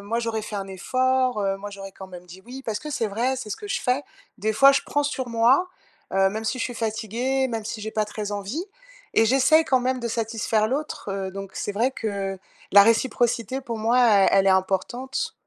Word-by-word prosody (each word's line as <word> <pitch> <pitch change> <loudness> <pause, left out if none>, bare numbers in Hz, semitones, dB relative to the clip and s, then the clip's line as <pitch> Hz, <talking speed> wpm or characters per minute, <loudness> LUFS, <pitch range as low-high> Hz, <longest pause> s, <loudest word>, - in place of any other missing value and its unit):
moi, 220 +4 -2
j'aurais 225 -1 -2
fait 210 0 -6
un 195 - -4
effort, 255 +4 0
heu, 195 0 0
moi, 205 +1 -7
j'aurais, 195 -1 -9
quand 190 - -10
même, 180 -1 -11
dit: 180 +2 -13
"oui"» 265 +2 -8
parce 215 -2 -2
que 305 - -8
c'est 230 -5 -1
vrai, 240 +6 -1
c'est 235 -4 -7
ce - - -3
que 415 - -9
je - - 0
fais. 255 +3 0 0.4
Des 215 +2 -1
fois, 275 +5 +7
je 275 - +2
prends 290 - +1
sur 270 -3 -3
moi, 240 +10 +3 0.5
heu, 195 0 +4
même 220 +2 -5
si 255 - -1
je - - -1
suis 245 - -5
fatiguée, 230 +4 -1
même 225 -2 -4
si 220 -1 -5
j'ai 220 - -4
pas 215 -1 -1
très 210 -1 -5
envie 205 - -4 0.5
et 225 - +4
j'essaye, 270 +6 +4
quand 260 -2 +2
même, 255 0 -1
de 235 - -3
satisfaire 225 -1 0
l'autre, 275 -3 -4
heu, 190 -1 -3
donc 195 0 -7
c'est 205 - -3
vrai 235 +6 +1
que 195 -4 -3 0.3
la 200 +1 +10
réciprocité, 230 +2 +1
pour 235 -4 -5
moi, 230 +3 +2
elle 210 -5 +5
elle 195 0 +4
est - - +6
importante. 195 +8 -1
225 Hz, 230 wpm, -24 LUFS, 200-255 Hz, 0.5 s, la